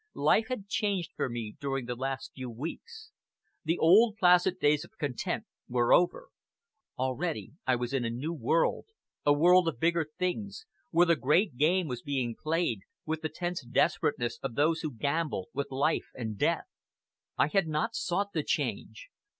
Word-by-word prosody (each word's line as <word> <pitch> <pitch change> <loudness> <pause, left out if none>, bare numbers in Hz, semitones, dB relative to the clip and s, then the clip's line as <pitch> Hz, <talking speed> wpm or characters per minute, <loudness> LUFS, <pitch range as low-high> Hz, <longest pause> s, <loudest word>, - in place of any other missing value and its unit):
Life 220 - +3
had 250 -6 -4
changed 200 -4 -1
for - - -1
me 115 -3 -5
during 135 -3 -2
the 125 - -3
last 130 +2 -4
few 130 -2 -6
weeks. 300 - -8 0.5
The 165 +1 0
old, 210 +6 +5
placid 180 -1 +4
days 150 0 +3
of 220 - -17
content 140 -5 -2 0.3
were 120 -1 +3
over; - - +2 0.7
already 130 +6 -2 0.2
I 130 - +4
was 120 +1 -3
in 135 -3 +1
a 115 - -1
new 135 +8 -3
world, 160 - +1 0.4
a - - +7
world 175 +4 +5
of 150 -8 -2
bigger 165 0 +2
things, 200 - -3 0.2
where 175 +1 +4
the 170 -1 +4
great 155 - +2
game 165 +6 +2
was 125 -3 -4
being 130 -5 -2
played, 160 - -1 0.3
with 160 0 -2
the 155 - -2
tense 175 -3 -4
desperateness 135 -1 0
of 130 -4 -4
those 160 +3 +2
who 155 -3 -3
gamble 140 - -2
with 140 - -3
life 140 +4 0
and 110 -4 -4
death. - - +1 0.7
I 140 - +3
had 195 0 +2
not 160 +10 -1
sought 200 0 -1
the - - 0
change! - - -3
155 Hz, 170 wpm, -30 LUFS, 130-180 Hz, 0.7 s, a